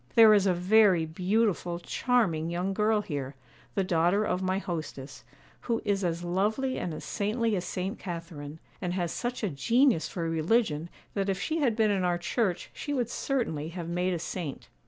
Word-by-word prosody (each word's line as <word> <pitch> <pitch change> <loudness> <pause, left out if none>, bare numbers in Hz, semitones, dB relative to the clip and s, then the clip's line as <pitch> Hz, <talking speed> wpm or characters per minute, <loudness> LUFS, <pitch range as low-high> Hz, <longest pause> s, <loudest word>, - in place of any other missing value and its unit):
'There 225 -2 +9
is 200 -2 +4
a 185 - +4
very 185 -2 +4
beautiful, 180 +1 0
charming 175 -5 +1
young 180 +3 -1
girl 215 +1 +2
here, 140 -5 -4 0.4
the 195 - +2
daughter 180 +3 +2
of 180 -1 -1
my 185 0 0
hostess, 155 -7 -5 0.4
who 230 -2 +1
is 200 -1 +1
as 170 -1 -1
lovely 210 +9 0
and 180 - -3
as 155 - -6
saintly 220 +1 0
as 180 - -2
St. 190 +2 -3
Catharine, 165 -5 -6 0.2
and 180 -1 -2
has 175 -3 -1
such 245 0 -3
a 210 - +1
genius 230 - +3
for 170 -2 -3
religion 165 0 +1 0.2
that 200 -1 -1
if 190 -1 0
she 320 +8 -1
had 250 -7 +2
been 220 -2 +3
in 195 -2 +1
our 175 -1 +2
Church 180 +1 -1
she 290 -1 -4
would 245 -2 -1
certainly 160 - -1
have 170 -1 -6
made 180 +2 0
a - - 0
saint. 165 -3 -5
185 Hz, 185 wpm, -29 LUFS, 170-220 Hz, 0.4 s, There